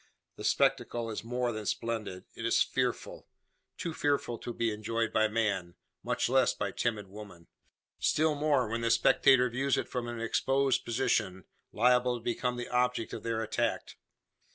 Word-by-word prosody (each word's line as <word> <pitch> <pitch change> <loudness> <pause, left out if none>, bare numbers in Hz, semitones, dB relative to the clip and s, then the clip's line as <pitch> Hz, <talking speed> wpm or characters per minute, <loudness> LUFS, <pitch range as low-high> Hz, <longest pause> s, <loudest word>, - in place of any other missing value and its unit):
The - - -9
spectacle 115 -1 +1
is 110 - -5
more 125 +1 -1
than 110 -2 -5
splendid 110 -5 -3
it - - -7
is - - +3
fearful - - -3 0.5
too 170 - -4
fearful 140 -6 -1
to 120 - -5
be 115 -2 -1
enjoyed 115 +1 -2
by 110 0 +4
man, 105 -6 -1 0.3
much - - 0
less - - +3
by - - -2
timid 110 -4 -2
woman. 95 -4 -11 0.5
Still 155 0 +2
more 145 -4 +1
when 115 +2 -2
the 115 - +1
spectator 125 +2 +5
views 130 +3 0
it - - -2
from 125 -2 -4
an 120 -1 -5
exposed 135 +3 +1
position, 115 -7 0 0.3
liable 125 +2 +3
to 115 - -13
become 125 +1 -1
the 120 - -4
object 125 -1 0
of - - -5
their 115 -1 -2
attack. 110 - -2
115 Hz, 165 wpm, -30 LUFS, 110-125 Hz, 0.5 s, spectator